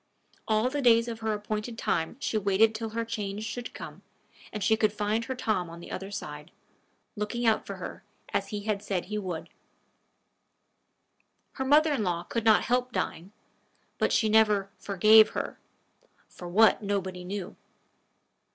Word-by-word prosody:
All 220 Hz, +1 st, +2 dB
the 290 Hz, 0 st, -1 dB
days 230 Hz, -2 st, +5 dB
of 230 Hz, -1 st, -5 dB
her 220 Hz, 0 st, -1 dB
appointed 215 Hz, +2 st, -4 dB
time 165 Hz, +4 st, -1 dB
she 255 Hz, -, -2 dB
waited 210 Hz, +2 st, +3 dB
till 220 Hz, 0 st, -4 dB
her 230 Hz, +1 st, -3 dB
change 210 Hz, -2 st, -4 dB
should 235 Hz, +3 st, -5 dB
come, -, -, -9 dB, 0.5 s
and 210 Hz, -2 st, -4 dB
she 220 Hz, +3 st, +4 dB
should 215 Hz, -1 st, +2 dB
find 210 Hz, +2 st, -1 dB
her 260 Hz, -, -4 dB
Tom 215 Hz, -8 st, -1 dB
on 170 Hz, 0 st, -10 dB
the 170 Hz, -, -10 dB
other 195 Hz, +1 st, -5 dB
side, 150 Hz, -7 st, -7 dB, 0.7 s
looking 220 Hz, +3 st, -3 dB
out 220 Hz, -1 st, +2 dB
for -, -, -5 dB
her, -, -, -8 dB, 0.3 s
as -, -, 0 dB
he 210 Hz, -2 st, -4 dB
had 205 Hz, -1 st, -2 dB
said 195 Hz, -4 st, -2 dB
he 210 Hz, +2 st, -3 dB
would. 180 Hz, -5 st, -5 dB, 2.0 s
Her 265 Hz, -, -4 dB
mother 300 Hz, +3 st, +5 dB
in 230 Hz, -, 0 dB
law 175 Hz, -2 st, -1 dB
could 230 Hz, +5 st, -3 dB
not 220 Hz, -1 st, +5 dB
help 250 Hz, +1 st, 0 dB
dying; 185 Hz, -3 st, -3 dB, 0.7 s
but -, -, +2 dB
she 220 Hz, -, +3 dB
never 210 Hz, -2 st, +3 dB
"forgave" 215 Hz, +3 st, +6 dB
her -, -, -4 dB, 0.7 s
for 175 Hz, -, -10 dB
what, 220 Hz, +7 st, +5 dB
nobody 190 Hz, -3 st, -2 dB
knew. 195 Hz, +1 st, -5 dB
215 Hz, 165 wpm, -28 LUFS, 195-225 Hz, 2.0 s, forgave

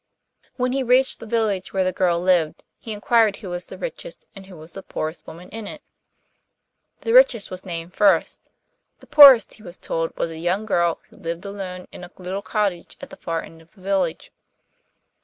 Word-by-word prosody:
When 250 Hz, -1 st, -1 dB
he 270 Hz, +1 st, 0 dB
reached 255 Hz, +1 st, +2 dB
the 230 Hz, -, -10 dB
village 215 Hz, -4 st, -1 dB
where 190 Hz, -1 st, +1 dB
the 185 Hz, -, 0 dB
girl 175 Hz, -1 st, +1 dB
lived, 175 Hz, -3 st, +1 dB, 0.2 s
he 225 Hz, -, -8 dB
inquired 215 Hz, 0 st, +2 dB
who 200 Hz, -3 st, -9 dB
was 175 Hz, 0 st, -4 dB
the -, -, -10 dB
richest -, -, -8 dB
and 195 Hz, -1 st, -11 dB
who 170 Hz, -5 st, -12 dB
the 175 Hz, +4 st, -10 dB
poorest 155 Hz, -2 st, -6 dB
woman 170 Hz, +3 st, -11 dB
in 225 Hz, -1 st, -8 dB
it. 305 Hz, -, -9 dB, 1.2 s
The 455 Hz, -, -1 dB
richest -, -, +5 dB
was 185 Hz, 0 st, -7 dB
named 170 Hz, 0 st, -6 dB
first; 205 Hz, 0 st, +1 dB, 0.5 s
the -, -, -17 dB
poorest, 280 Hz, -5 st, +8 dB
he -, -, -16 dB
was 175 Hz, -4 st, -10 dB
told, 165 Hz, 0 st, -3 dB
was 165 Hz, -, -2 dB
a 160 Hz, -, -8 dB
young 180 Hz, +5 st, -1 dB
girl 170 Hz, -5 st, 0 dB
who -, -, -20 dB
lived 170 Hz, +3 st, -6 dB
alone 190 Hz, -2 st, -7 dB
in -, -, -11 dB
a 175 Hz, -, -9 dB
little 185 Hz, +2 st, -5 dB
cottage 200 Hz, -5 st, -2 dB
at -, -, -11 dB
the -, -, -9 dB
far 165 Hz, -1 st, -4 dB
end 165 Hz, 0 st, -14 dB
of 165 Hz, +1 st, -24 dB
the 190 Hz, -, -19 dB
village. 190 Hz, -3 st, -2 dB
190 Hz, 195 wpm, -22 LUFS, 175-220 Hz, 1.2 s, poorest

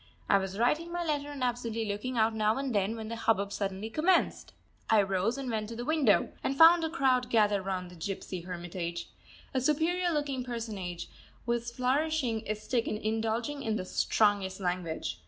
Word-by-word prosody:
I 200 Hz, -, +5 dB
was 190 Hz, 0 st, -4 dB
writing 300 Hz, +9 st, +1 dB
my 350 Hz, 0 st, -2 dB
letter 290 Hz, -2 st, -1 dB
and 280 Hz, -3 st, -5 dB
absently 235 Hz, -2 st, -1 dB
looking 210 Hz, +5 st, -3 dB
out 220 Hz, 0 st, +3 dB
now 215 Hz, +1 st, +1 dB
and 270 Hz, -2 st, -2 dB
then 205 Hz, +2 st, +1 dB
when 220 Hz, -1 st, -6 dB
the 230 Hz, -, -4 dB
hubbub 200 Hz, -3 st, +1 dB
suddenly 200 Hz, +1 st, -3 dB
commenced. 340 Hz, +7 st, +1 dB, 0.4 s
I 215 Hz, -2 st, +5 dB
rose 195 Hz, +5 st, 0 dB
and 270 Hz, -1 st, -4 dB
went 215 Hz, -1 st, -2 dB
to 230 Hz, -, -6 dB
the 240 Hz, +1 st, -5 dB
window, 300 Hz, -8 st, +3 dB
and 270 Hz, -, -1 dB
found 330 Hz, +2 st, +8 dB
a 320 Hz, -, 0 dB
crowd 260 Hz, -6 st, +2 dB
gathered 210 Hz, -4 st, +3 dB
round 185 Hz, -2 st, -4 dB
the -, -, -12 dB
gypsy 185 Hz, +1 st, -5 dB
hermitage. 175 Hz, -1 st, -5 dB, 0.4 s
A 260 Hz, -, +1 dB
superior 330 Hz, +6 st, +1 dB
looking 290 Hz, -4 st, -1 dB
personage 215 Hz, -8 st, -5 dB, 0.4 s
was 235 Hz, 0 st, -1 dB
flourishing 255 Hz, -1 st, 0 dB
a 215 Hz, -, 0 dB
stick 225 Hz, +2 st, -1 dB
and 210 Hz, -, -1 dB
indulging 225 Hz, +6 st, -1 dB
in 220 Hz, -4 st, -1 dB
the 185 Hz, -, -3 dB
strongest 200 Hz, -1 st, +1 dB
language. 175 Hz, -, -3 dB
225 Hz, 185 wpm, -30 LUFS, 200-270 Hz, 0.4 s, found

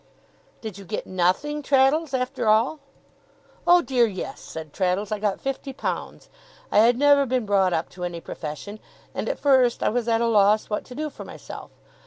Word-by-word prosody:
'Did 215 Hz, -4 st, -7 dB
you -, -, -10 dB
get 210 Hz, +3 st, -5 dB
nothing, 185 Hz, +12 st, 0 dB
Traddles, 280 Hz, +2 st, +3 dB
after 255 Hz, -2 st, -2 dB
all?' 230 Hz, +8 st, +3 dB, 0.9 s
'Oh 350 Hz, 0 st, +6 dB
dear, 250 Hz, -5 st, +3 dB
yes!' 190 Hz, -4 st, -6 dB
said 160 Hz, -2 st, -9 dB
Traddles. 195 Hz, +2 st, -1 dB
'I 215 Hz, -, -1 dB
got 205 Hz, -1 st, -1 dB
fifty 270 Hz, 0 st, -4 dB
pounds. -, -, -5 dB, 0.4 s
I -, -, +4 dB
had 235 Hz, +2 st, +5 dB
never 285 Hz, 0 st, +4 dB
been 250 Hz, -2 st, 0 dB
brought 195 Hz, -2 st, +2 dB
up 160 Hz, -1 st, -1 dB
to 180 Hz, -, -9 dB
any 175 Hz, -1 st, -4 dB
profession, 165 Hz, +7 st, -7 dB, 0.3 s
and -, -, -3 dB
at -, -, -2 dB
first 260 Hz, -4 st, +3 dB
I -, -, +3 dB
was 240 Hz, +1 st, -1 dB
at 225 Hz, -1 st, +2 dB
a 235 Hz, -, +1 dB
loss 215 Hz, -1 st, +3 dB
what 210 Hz, -, -2 dB
to 250 Hz, -, -11 dB
do 305 Hz, +1 st, -3 dB
for -, -, -9 dB
myself. -, -, -10 dB
225 Hz, 190 wpm, -24 LUFS, 200-270 Hz, 0.9 s, Oh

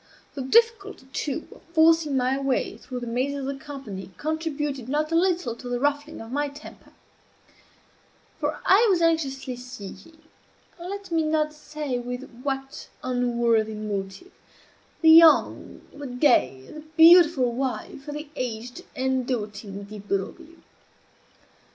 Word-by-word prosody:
The 280 Hz, -, -5 dB
difficulty, 410 Hz, -, +2 dB
too, 295 Hz, +2 st, -3 dB
of -, -, -17 dB
forcing 320 Hz, -3 st, +4 dB
my 255 Hz, +1 st, +1 dB
way 275 Hz, -2 st, -1 dB
through 250 Hz, -1 st, -7 dB
the -, -, -4 dB
mazes 260 Hz, +4 st, -2 dB
of -, -, -4 dB
the 275 Hz, +1 st, -3 dB
company 215 Hz, -11 st, -8 dB
contributed 295 Hz, -5 st, -3 dB
not 305 Hz, +3 st, 0 dB
a -, -, +1 dB
little 340 Hz, -8 st, +1 dB
to 245 Hz, +1 st, -9 dB
the 245 Hz, 0 st, -1 dB
ruffling 290 Hz, +3 st, -1 dB
of 225 Hz, +1 st, -10 dB
my 290 Hz, +2 st, -1 dB
temper; 285 Hz, +2 st, -13 dB, 1.5 s
for -, -, -2 dB
I 420 Hz, +5 st, +6 dB
was 370 Hz, -3 st, +3 dB
anxiously 280 Hz, -6 st, 0 dB
seeking 245 Hz, -, -10 dB, 0.6 s
(let 385 Hz, +2 st, -7 dB
me 330 Hz, -1 st, +2 dB
not 310 Hz, -1 st, 0 dB
say 300 Hz, -4 st, -4 dB
with 245 Hz, +2 st, -6 dB
what 270 Hz, 0 st, -4 dB, 0.2 s
unworthy 235 Hz, -3 st, +1 dB
motive) 205 Hz, -, -5 dB, 0.7 s
the 320 Hz, -1 st, +7 dB
young, 325 Hz, -1 st, +5 dB
the 290 Hz, -1 st, -7 dB
gay, 245 Hz, -, +2 dB
the 305 Hz, -, -10 dB, 0.2 s
beautiful 325 Hz, -6 st, +7 dB
wife 265 Hz, +2 st, -4 dB
of 295 Hz, -, -5 dB
the 300 Hz, 0 st, -6 dB
aged 245 Hz, -1 st, -5 dB
and 260 Hz, -1 st, 0 dB
doting 210 Hz, -4 st, -4 dB
Di 210 Hz, +1 st, -9 dB
Broglio. 205 Hz, -, -4 dB
275 Hz, 140 wpm, -25 LUFS, 245-315 Hz, 1.5 s, the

